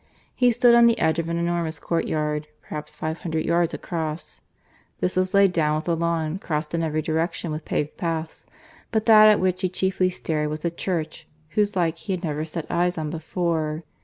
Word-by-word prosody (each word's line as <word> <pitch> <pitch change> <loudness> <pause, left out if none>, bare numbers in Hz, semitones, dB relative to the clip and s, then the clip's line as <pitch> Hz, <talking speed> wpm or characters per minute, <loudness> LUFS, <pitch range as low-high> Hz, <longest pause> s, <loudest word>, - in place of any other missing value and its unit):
He 250 -1 +3
stood 240 +1 +5
on 235 0 +7
the 230 - +3
edge 160 +1 +1
of 165 0 -2
an 170 - -1
enormous 170 -2 -1
courtyard, 150 -2 -1 0.2
perhaps 150 0 -7
five 160 +1 -4
hundred 160 -2 -2
yards 170 0 +2
across. 160 -2 -5 0.6
This 180 - 0
was 185 +2 +1
laid 200 -2 +5
down 150 -3 +2
with 155 - -4
a 170 - +2
lawn, 165 0 -1
crossed 155 -3 -3
in 165 - 0
every 155 -1 -1
direction 165 +1 -1
with 155 0 -5
paved 150 0 -2
paths. 165 -1 -4 0.4
But 220 -1 0
that 215 -1 +8
at 210 - +5
which 185 0 0
he 185 - +1
chiefly 185 0 +1
stared 155 -4 -2
was 155 +2 -5
a 170 - +1
church 165 -2 -3 0.2
whose 205 +4 0
like 170 -2 +1
he 195 - -3
had 185 0 -4
never 155 -1 -2
set 160 0 -5
eyes 175 +1 +1
on 155 -2 -3
before. 160 -1 -2
165 Hz, 200 wpm, -24 LUFS, 155-185 Hz, 0.6 s, that